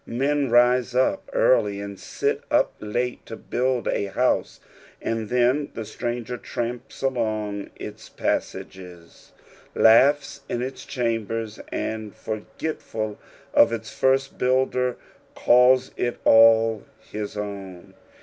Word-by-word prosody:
Men 140 +3 0
rise 120 +1 +3
up 130 +9 +1
early 105 -5 +2
and 100 -1 -7
sit - - -2
up - - +2
late 120 +4 -3
to 115 - -6
build 125 +1 -1
a - - 0
house, 100 - 0 0.4
and 115 -2 -3
then 125 +4 +2
the 115 - -5
stranger 120 +2 -4
tramps 120 +3 -5
along 110 -6 -2
its - - -9
pasanges, 90 -3 -5 0.4
iaughs 140 +6 +4
in 120 - -2
its 130 +1 -6
chambers, 115 -3 -2
and 110 -2 -4
for 110 -1 -5 0.2
getful 110 -9 -4 0.4
of - - +6
its 115 -1 -5
first 135 +1 +1
builder, 125 -1 +1 0.4
calls 125 +1 +4
it 120 - -2
all 115 -1 +6 0.3
his 105 0 -5
own. 100 -3 -7
115 Hz, 120 wpm, -24 LUFS, 110-125 Hz, 0.4 s, of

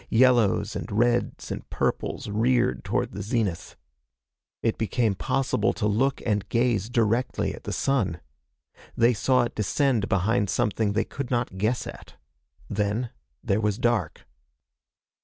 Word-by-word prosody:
Yellows 120 -3 +3
and - - -5
reds 120 +3 0
and - - -6
purples - - -2
reared 110 - +1
toward - - -1
the 100 - -6
zenith. 100 -5 -2 0.9
It 115 - 0
became 110 -1 +1
possible 135 +7 0
to 105 - -2
look 125 +6 +1
and 105 -3 0
gaze 115 -3 +1
directly 120 +1 0
at - - -11
the - - -3
sun. 105 -11 0 0.8
They 120 +1 +5
saw 125 +3 +2
it 120 - -3
descend 115 0 +1
behind 100 +2 +1
something 105 -1 0
they 110 - +1
could 140 -2 -5
not 120 -6 -1
guess 110 +5 0
at. - - -10 0.5
Then 105 +4 -1 0.3
there 105 -1 +1
was 105 -1 0
dark. 120 -9 0
115 Hz, 140 wpm, -26 LUFS, 105-120 Hz, 0.9 s, They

